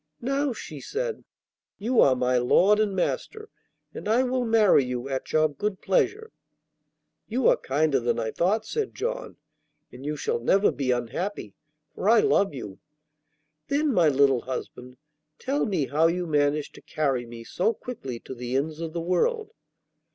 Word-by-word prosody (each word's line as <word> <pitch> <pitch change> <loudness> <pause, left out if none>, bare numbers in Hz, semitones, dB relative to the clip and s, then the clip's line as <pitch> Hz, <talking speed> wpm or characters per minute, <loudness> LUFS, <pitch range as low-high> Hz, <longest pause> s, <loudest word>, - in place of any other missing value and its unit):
'Now,' 275 +3 0
she 155 - -8
said, 475 +1 -4 0.5
'you 235 +4 0
are 130 - +5
my 125 0 +1
lord 190 +12 +4
and 210 -3 +1
master, 435 - -3 0.4
and - - -7
I 235 +4 +4
will 255 -1 -1
marry 220 -10 +4
you 125 0 -4
at 135 -1 -4
your 155 0 +4
good 190 +7 -4
pleasure.' 425 - 0 1.0
'You 245 +3 +1
are - - +6
kinder 145 0 +1
than 120 -1 0
I 110 -1 -2
thought,' 210 +5 0
said 445 - -3
John; - - -4 0.5
'and 125 +2 -11
you 150 +1 -3
shall 125 - -1
never 195 - +3
be 135 -3 -3
unhappy, 125 - -2 0.4
for 200 - -1
I 230 0 +6
love 200 -1 +3
you.' 115 -9 -8 0.9
'Then, 290 0 +1
my 170 -6 +4
little 135 -3 +3
husband, 125 -1 -7 0.4
tell 275 0 -1
me 185 -9 0
how 155 +4 +2
you 175 +1 -1
managed 145 -1 0
to - - -14
carry 135 -6 -1
me 115 0 -9
so 180 - 0
quickly 135 - -7
to - - -8
the 125 0 -5
ends 155 +4 -2
of 165 -1 -5
the 170 - -3
world. 430 - 0
165 Hz, 165 wpm, -26 LUFS, -, 1.0 s, are